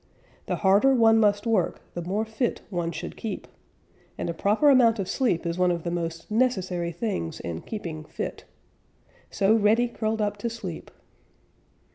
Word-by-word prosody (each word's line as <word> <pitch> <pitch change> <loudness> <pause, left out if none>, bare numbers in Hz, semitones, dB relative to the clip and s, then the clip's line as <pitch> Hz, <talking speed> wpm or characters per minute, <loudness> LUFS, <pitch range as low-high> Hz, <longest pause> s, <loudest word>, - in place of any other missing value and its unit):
The - - 0
harder 205 +8 +4
one 225 -2 +5
must 205 -1 +2
work, 220 -6 0
the 175 - -4
more 195 +6 -1
fit 220 +3 -2
one 170 -2 -1
should 160 - -6
keep, 220 -3 -5 0.7
and - - -2
a - - -6
proper 215 - +3
amount 235 -4 +5
of 195 -3 -3
sleep 195 -7 0
is 170 +1 -2
one 180 0 +4
of 170 -2 -1
the 170 - -2
most 165 +1 -4
necessary 190 -8 0
things 170 - -3
in 85 -1 -5
keeping 165 -8 -6
fit. - - -6 0.8
So 200 +1 +2
Reddy 225 +2 +4
curled 220 -1 -2
up 205 -1 -1
to 235 +3 -2
sleep. 195 -8 -7
205 Hz, 165 wpm, -26 LUFS, 175-225 Hz, 0.8 s, one